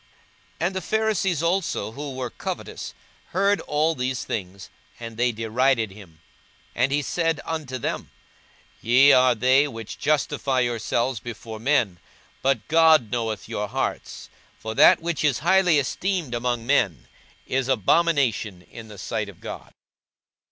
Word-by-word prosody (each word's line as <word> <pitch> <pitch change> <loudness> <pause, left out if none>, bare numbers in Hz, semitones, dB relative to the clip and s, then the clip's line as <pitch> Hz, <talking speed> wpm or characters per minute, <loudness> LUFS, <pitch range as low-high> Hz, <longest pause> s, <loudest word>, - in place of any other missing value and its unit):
42:016:014 170 - +1
And 190 - -5
the 190 - -2
Pharisees 200 -5 0
also, 170 - -1
who 140 +2 -6
were 125 -2 -4
covetous, - - -6 0.3
heard 200 +2 +1
all 155 +2 +1
these 130 -2 -2
things: 95 +1 -6 0.3
and 115 -1 -7
they 120 +2 +1
derided 115 0 +1
him. 90 -6 -15 0.5
42:016:015 125 - +1
And 135 - +2
he 145 +1 +1
said 165 +2 0
unto 150 -6 -4
them, 120 - -4 0.7
Ye 130 +5 +6
are 125 -2 +5
they 130 +5 +4
which 115 -5 -8
justify 140 -3 0
yourselves 120 0 -1
before 115 -1 -8
men; 115 - +1 0.4
but 135 -4 0
God 160 -8 +5
knoweth 110 -4 -3
your 105 - -3
hearts: - - -4 0.3
for 110 - -6
that 145 +6 +6
which 170 -2 -2
is 145 -5 +2
highly 180 -3 +4
esteemed 165 +1 -1
among 120 -1 -2
men 100 - +1 0.4
is 130 -1 -1
abomination 130 - +1
in 115 -1 -10
the 105 -1 -12
sight 105 +1 -3
of 95 - -14
God. - - -8
130 Hz, 145 wpm, -24 LUFS, 110-155 Hz, 0.7 s, Ye